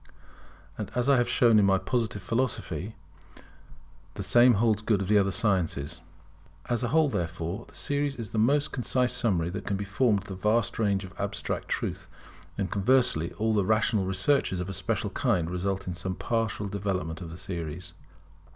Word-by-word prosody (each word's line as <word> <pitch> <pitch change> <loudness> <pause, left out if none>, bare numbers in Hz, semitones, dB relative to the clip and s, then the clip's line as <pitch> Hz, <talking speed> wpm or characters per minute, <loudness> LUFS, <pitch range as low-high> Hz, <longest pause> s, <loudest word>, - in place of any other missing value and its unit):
And - - -4
I 130 +3 +3
have 120 0 +1
shown 115 -3 +5
in 100 - +4
my 95 0 +4
Positive 110 -2 -2
Philosophy 115 -1 -2 0.4
that - - -18 0.7
the 100 - -4
same 120 +4 +5
holds 110 0 +2
good 105 -2 +1
of 95 - -2
the 105 +1 +5
other 100 -1 +2
sciences. 90 -9 0 0.7
As 120 0 0
a 125 - 0
whole, 160 +3 +3
therefore, 85 - -3
the - - -19
series 145 -1 -1
is 115 -5 -7
the 110 - -1
most 145 +6 +2
concise 125 -1 0
summary 95 -9 +1
that 100 +2 -6
can 100 - 0
be 100 - -4
formed 105 0 +1
of - - -15
the 95 - -6
vast 110 +5 0
range 100 -3 +1
of 95 -1 -10
Abstract - - -3
truth; - - -3 0.5
and 95 -3 -2
conversely, 100 -6 +2
all 110 -1 +1
rational 110 0 +2
researches 95 +1 +1
of 90 +1 -4
a - - -5
special 90 -1 -2
kind 85 -1 0
result 95 +2 -2
in 90 - -3
some 90 +1 -4
partial 115 -2 -1
development 95 -5 -3
of 85 - -6
this 85 +2 -8
series. 85 0 -5
100 Hz, 180 wpm, -28 LUFS, 95-120 Hz, 0.7 s, shown